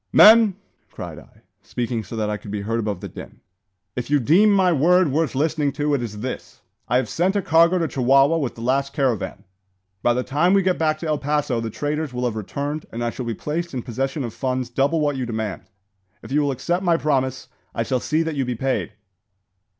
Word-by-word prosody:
"Men!" 220 -2 +7 0.3
cried - - -8
I, - - -20 0.2
speaking 120 -2 -3
so 105 - -8
that 110 -1 -1
I 105 - -1
could 105 - -11
be 100 0 -3
heard 115 +3 -2
above 105 -5 -3
the - - -5
din, - - -11 0.6
"if 125 +1 -4
you 145 0 +3
deem 175 - +5
my 190 -3 +4
word 170 +2 +4
worth 150 -1 0
listening 150 0 +1
to, 150 -1 0
it 140 - +1
is 105 -3 -6
this: 130 +2 -6 0.3
I 125 - +2
have 130 -2 0
sent 180 - 0
a 200 - +2
cargo 170 +3 +4
to 165 -2 0
Chihuahua 135 +5 +3
with 135 -5 -3
the 115 - -10
last 135 +3 0
caravan. 125 -8 -1 0.6
By 120 - +2
the 125 - 0
time 170 +9 +2
we 195 - +3
get 185 -1 +1
back 155 -1 +1
to 165 - -3
El 150 -2 0
Paso 145 -4 0
the 115 - -3
traders 145 +2 -3
will 125 0 -1
have 120 -3 -1
returned, 140 +8 -4
and 120 +1 -4
I 120 - -1
shall 125 0 -6
be 115 - -2
placed 165 +4 -4
in 125 - -3
possession 135 +4 -3
of 115 -3 -5
funds 130 -2 -2
double 140 +6 +1
what 145 -2 0
you 125 -2 -3
demand. 110 -3 -4 0.6
If - - -10
you 150 +2 +3
will 145 - +1
accept 175 +8 -1
my 175 -3 +2
promise, 130 -4 -1 0.3
I 115 - 0
shall 130 +2 -1
see 155 +6 0
that 160 -1 -3
you 140 -2 -1
be 125 -1 -3
paid." 130 -1 -2
135 Hz, 225 wpm, -22 LUFS, 120-160 Hz, 0.6 s, Men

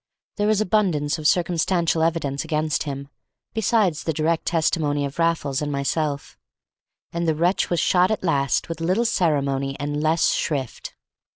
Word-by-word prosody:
There 205 0 +1
was 215 -1 +3
abundance 175 -8 +1
of 150 - +1
circumstantial 170 -1 +1
evidence 160 -4 0
against 155 -1 -1
him, 140 0 -6 0.5
besides 210 -7 +1
the 160 - -1
direct 160 +2 0
testimony 155 -3 +1
of 140 +3 -7
Raffles 165 -5 0
and 145 -1 -2
myself, 140 +1 -2 0.7
and 170 0 -1
the 160 - +2
wretch 175 +5 +1
was 175 - +1
shot 180 +3 +3
at 220 -3 -2
last 140 -6 +1
with 165 -1 -6
little 185 +8 +1
ceremony 140 - 0
and 145 +1 -2
less 160 +2 +2
shrift. 135 -6 -3
160 Hz, 155 wpm, -23 LUFS, 145-175 Hz, 0.7 s, was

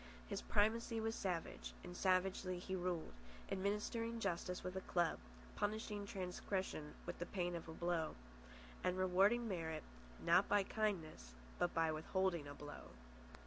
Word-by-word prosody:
His - - -2
primacy 225 +2 +3
was 225 0 0
savage, 180 -6 -2
and 180 - -7
savagely 185 0 +2
he 190 +1 -3
ruled, 175 -3 -1 0.4
administering 210 +4 0
justice 180 -2 -1
with 185 0 -3
a 190 - -1
club, 175 -3 +2 0.4
punishing 205 -1 -1
transgression 185 -4 -2
with 175 - -4
the 175 - -2
pain 175 -2 -1
of 165 - -5
a - - -5
blow, 170 -2 0 0.7
and 180 0 +2
rewarding 195 +6 +4
merit, 160 -5 -2 0.4
not 175 +4 +5
by 205 -1 +5
kindness, 170 - -1 0.2
but 175 - +2
by 165 -1 +4
withholding 170 0 +1
a 145 - -6
blow. 145 0 -8
185 Hz, 145 wpm, -41 LUFS, 170-205 Hz, 0.7 s, not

